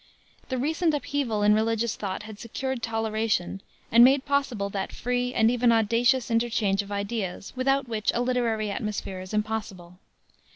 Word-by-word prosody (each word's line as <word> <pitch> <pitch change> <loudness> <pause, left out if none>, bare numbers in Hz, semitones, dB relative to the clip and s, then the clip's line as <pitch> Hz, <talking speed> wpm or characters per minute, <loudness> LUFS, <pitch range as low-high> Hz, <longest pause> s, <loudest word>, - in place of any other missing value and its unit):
The 260 - -1
recent 315 +4 +1
upheaval 270 -7 -1
in 210 0 +5
religious 225 +1 +1
thought 195 0 -4
had 215 -1 -10
secured 260 +2 -4
toleration, 220 -4 -1 0.3
and 235 +1 +8
made 265 +2 +5
possible 275 -8 0
that 195 -1 -3
free 250 0 -1
and 225 -2 +3
even 245 -1 +3
audacious 235 +3 +2
interchange 225 -4 +1
of 200 0 -11
ideas 200 -2 -4
without 270 +1 +1
which 220 -2 0
a 240 - +1
literary 235 -4 0
atmosphere 200 -3 -4
is 185 - -9
impossible. 210 -5 -4
225 Hz, 155 wpm, -26 LUFS, 210-250 Hz, 0.3 s, and